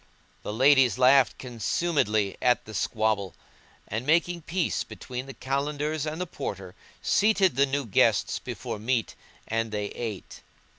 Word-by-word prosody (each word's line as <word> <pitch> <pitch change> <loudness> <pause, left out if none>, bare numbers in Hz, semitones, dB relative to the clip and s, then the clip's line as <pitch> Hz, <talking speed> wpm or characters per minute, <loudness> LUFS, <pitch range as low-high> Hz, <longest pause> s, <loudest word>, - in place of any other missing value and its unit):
The - - -5
ladies 130 -1 +4
laughed 130 +1 +5
consumedly 120 - 0
at 125 -2 +2
the 110 - -10
squabble; 110 -3 -1 0.5
and, 110 +3 -3
making 170 +4 +2
peace 175 +2 -1
between 125 0 -7
the 135 - -8
Kalandars 145 +3 -2
and 160 - -7
the 180 - -1
Porter, 95 - -6 0.3
seated 195 - +3
the 140 +2 +3
new 140 0 -1
guests 105 - +2
before 105 - -6
meat 115 +1 -1 0.3
and 115 0 -1
they 105 -1 -3
ate. 110 -5 -7
130 Hz, 140 wpm, -27 LUFS, 110-150 Hz, 0.5 s, laughed